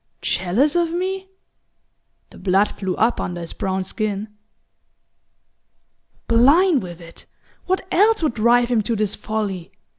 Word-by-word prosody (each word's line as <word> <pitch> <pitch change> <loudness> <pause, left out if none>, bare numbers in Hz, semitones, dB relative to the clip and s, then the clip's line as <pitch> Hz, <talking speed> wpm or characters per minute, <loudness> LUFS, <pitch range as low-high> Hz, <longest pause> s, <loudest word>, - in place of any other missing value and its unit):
"Jealous 215 - +1
of 340 -1 +1
me?" 380 +2 -3 1.0
The - - -14
blood 195 +2 +2
flew 190 -2 -4
up 230 +2 +1
under 175 -1 -4
his 170 -1 -7
brown 190 0 -2
skin. 210 +1 -3 2.0
"Blind 285 +8 +4
with 175 -2 -9
it 170 -1 -14 0.4
what 375 0 0
else 425 0 +3
would 300 - +1
drive 235 +2 +3
him 235 -3 +2
to 230 +2 -2
this 210 -1 0
folly? 205 -5 -4
220 Hz, 130 wpm, -21 LUFS, 190-310 Hz, 2.0 s, Blind